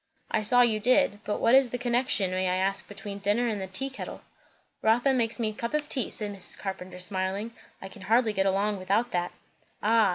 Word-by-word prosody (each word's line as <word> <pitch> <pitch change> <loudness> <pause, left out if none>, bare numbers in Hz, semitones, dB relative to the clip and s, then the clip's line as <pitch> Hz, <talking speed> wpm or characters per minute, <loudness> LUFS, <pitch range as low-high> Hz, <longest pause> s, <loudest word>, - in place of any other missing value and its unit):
"I 220 - +1
saw 245 +4 +4
you 220 -3 +2
did. 255 -1 +3
But 210 - -2
what 230 - +3
is 265 -1 +6
the 245 - -3
connection, 245 -5 +1
may 185 0 0
I 180 - +1
ask, 195 +1 -1
between 205 -1 -7
dinner 210 +4 +1
and 210 -4 -2
the 190 - -4
tea 270 +9 -1
kettle?" 265 - -7 0.6
"Rotha 240 +5 +3
makes 235 -2 0
me 225 -2 +1
a - - -6
cup 235 +6 -3
of 300 -1 -1
tea," 260 -5 0
said 210 -2 -4
Mrs. 195 -2 -4
Carpenter 190 -2 -6
smiling. 190 +4 -3 0.3
"I - - -6
can 195 +1 -13
hardly 225 +3 +2
get 195 -1 +1
along 200 +2 +1
without 205 +6 0
that." 175 0 -1 0.5
"Ah! 220 0 +4
210 Hz, 220 wpm, -27 LUFS, 195-240 Hz, 0.6 s, is